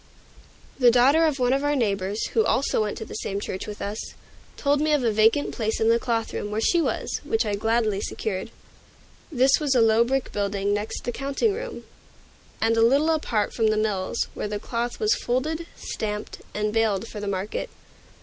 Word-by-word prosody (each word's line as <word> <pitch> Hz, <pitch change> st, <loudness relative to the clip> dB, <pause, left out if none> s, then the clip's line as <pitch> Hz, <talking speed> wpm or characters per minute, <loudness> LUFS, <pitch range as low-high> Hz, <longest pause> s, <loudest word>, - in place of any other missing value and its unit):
The 250 Hz, -2 st, +7 dB
daughter 265 Hz, +7 st, +5 dB
of 305 Hz, -3 st, +1 dB
one 250 Hz, -1 st, +2 dB
of 275 Hz, +1 st, 0 dB
our 290 Hz, 0 st, +1 dB
neighbors, 205 Hz, -4 st, -1 dB
who 445 Hz, -, +2 dB
also 270 Hz, -, +1 dB
went 210 Hz, -1 st, -2 dB
to 220 Hz, -, -6 dB
the -, -, -10 dB
same 200 Hz, -2 st, -3 dB
church 190 Hz, -1 st, -5 dB
with 210 Hz, -1 st, -6 dB
us, 205 Hz, +2 st, -4 dB, 0.6 s
told 285 Hz, 0 st, +1 dB
me 305 Hz, 0 st, +2 dB
of 290 Hz, -4 st, +2 dB
a 230 Hz, -, +2 dB
vacant 220 Hz, +7 st, +3 dB
place 220 Hz, -2 st, -1 dB
in 225 Hz, -, +3 dB
the 230 Hz, 0 st, +4 dB
cloth 230 Hz, -2 st, -1 dB
room, 205 Hz, -, -3 dB
where 210 Hz, +1 st, -2 dB
she 340 Hz, +9 st, +3 dB
was, -, -, -2 dB
which 450 Hz, -, 0 dB
I 210 Hz, -, -1 dB
gladly 220 Hz, -1 st, +1 dB
secured. 200 Hz, 0 st, -3 dB, 0.8 s
This 265 Hz, -1 st, +4 dB
was 290 Hz, -4 st, +1 dB
a -, -, +5 dB
low 225 Hz, 0 st, +5 dB
brick 265 Hz, +2 st, -1 dB
building 200 Hz, 0 st, -1 dB
next 205 Hz, +1 st, -3 dB
the 245 Hz, -, -2 dB
counting 280 Hz, -, 0 dB
room, 485 Hz, +3 st, -6 dB, 0.8 s
and 225 Hz, 0 st, +2 dB
a 225 Hz, -, +3 dB
little 280 Hz, +7 st, +4 dB
apart 235 Hz, -10 st, 0 dB
from 225 Hz, -2 st, +2 dB
the 215 Hz, 0 st, +2 dB
mills, 205 Hz, -3 st, -1 dB
where -, -, -4 dB
the 210 Hz, 0 st, -3 dB
cloth 235 Hz, +3 st, -3 dB
was 430 Hz, -1 st, +3 dB
folded, 310 Hz, +7 st, -2 dB
stamped, 210 Hz, -1 st, -5 dB
and 210 Hz, 0 st, -1 dB
baled 225 Hz, -2 st, +1 dB
for 215 Hz, -, -7 dB
the 205 Hz, -, -5 dB
market. 195 Hz, +1 st, -3 dB
225 Hz, 200 wpm, -25 LUFS, 210-275 Hz, 0.8 s, The